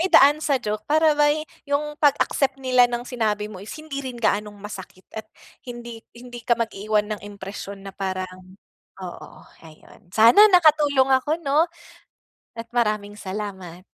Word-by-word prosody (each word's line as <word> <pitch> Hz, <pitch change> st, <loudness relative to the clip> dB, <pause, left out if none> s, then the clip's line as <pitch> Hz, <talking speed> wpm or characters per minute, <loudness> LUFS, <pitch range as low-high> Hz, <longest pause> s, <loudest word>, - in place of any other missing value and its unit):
idaan 285 Hz, -1 st, +7 dB
sa 285 Hz, -3 st, +1 dB
joke 215 Hz, -3 st, -3 dB
para 310 Hz, +1 st, +4 dB
ba'y 295 Hz, +1 st, +2 dB, 0.2 s
'yong 300 Hz, +1 st, -1 dB
pag-accept 275 Hz, -2 st, +2 dB
nila 255 Hz, -2 st, +3 dB
ng 240 Hz, 0 st, -4 dB
sinabi 215 Hz, -4 st, -2 dB
mo 185 Hz, -, -9 dB
is 205 Hz, -, -11 dB
hindi 310 Hz, -3 st, -6 dB
rin 255 Hz, -3 st, -7 dB
gaanong 210 Hz, -2 st, -1 dB
masakit 195 Hz, -2 st, -10 dB
at 215 Hz, -1 st, -8 dB, 0.3 s
hindi 240 Hz, -2 st, -9 dB, 0.2 s
hindi 240 Hz, 0 st, -10 dB
ka 235 Hz, 0 st, +1 dB
mag 230 Hz, -1 st, -2 dB
iiwan 210 Hz, +1 st, -1 dB
ng 210 Hz, -, -6 dB
impresiyon 200 Hz, 0 st, -9 dB
na 195 Hz, -, -8 dB
parang 185 Hz, -1 st, -6 dB, 0.5 s
oo 175 Hz, -, -9 dB, 0.3 s
ayun. 160 Hz, +2 st, -18 dB
Sana 230 Hz, -, +7 dB
nakatulong 295 Hz, -7 st, +4 dB
ako 305 Hz, +4 st, -1 dB
'no. 300 Hz, +5 st, +2 dB, 0.9 s
At 230 Hz, -, -5 dB
maraming 210 Hz, -3 st, 0 dB
salamat. 190 Hz, -3 st, -7 dB
230 Hz, 150 wpm, -23 LUFS, 205-275 Hz, 0.9 s, idaan